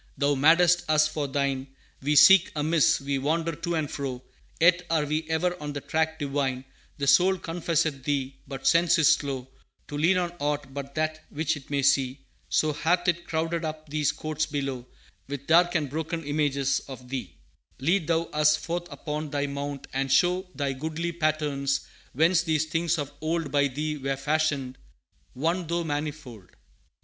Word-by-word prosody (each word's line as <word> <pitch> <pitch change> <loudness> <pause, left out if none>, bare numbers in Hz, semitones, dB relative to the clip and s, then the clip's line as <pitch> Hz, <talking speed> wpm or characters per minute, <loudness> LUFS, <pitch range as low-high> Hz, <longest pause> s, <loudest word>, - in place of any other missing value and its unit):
"Thou 145 +1 +2
madest 170 +5 +4
us 155 0 +4
for 150 -2 -3
Thine; 135 -1 -1 0.3
We 145 +3 +1
seek 190 +4 +7
amiss, 155 +1 +3
we 140 0 -1
wander 160 +4 0
to 170 0 -2
and 155 -2 -1
fro; 130 -3 -5 0.4
Yet 170 +1 +5
are 160 -2 +2
we 155 +2 -2
ever 175 +2 0
on 150 -1 -4
the 145 - -5
track 160 +2 -1
Divine; 135 -3 -2 0.3
The 140 - -2
soul 185 +7 +5
confesseth 165 -5 -1
Thee, 140 -2 -1
but 135 -1 -7
sense 170 0 +4
is 155 -3 +6
slow 135 -3 -3 0.4
To 145 - -5
lean 175 +5 +4
on 175 -1 -1
aught 145 -2 -2
but 140 0 -7
that 155 0 -2
which 160 +2 -1
it 140 -3 -12
may 140 -1 0
see; 135 0 +2 0.3
So 155 -1 +2
hath 175 +4 +1
it 170 0 -2
crowded 165 +1 -1
up 155 -1 -5
these 150 -1 +1
Courts 155 0 -3
below 135 -4 -4 0.4
With 140 0 -6
dark 175 +3 +4
and 155 -4 +1
broken 160 +4 -4
images 140 -2 0
of 130 -2 -10
Thee; 125 -7 -5 0.4
Lead 165 +5 +1
Thou 165 0 +2
us 150 0 +4
forth 175 +2 -4
upon 150 0 -4
Thy 145 0 -1
Mount, 140 0 -5
and 135 0 -1
show 180 +5 +3
Thy 140 -2 -1
goodly 160 +5 -3
patterns, 150 -4 0 0.3
whence 165 +5 +4
these 160 -2 0
things 165 +1 0
of 145 -2 -4
old 160 0 -1
By 140 -1 +3
Thee 150 +3 -3
were 135 0 -1
fashioned; 145 -2 -1 0.6
One 165 +6 -1
though 170 +1 -1
manifold. 145 - -5
150 Hz, 175 wpm, -26 LUFS, 140-165 Hz, 0.6 s, seek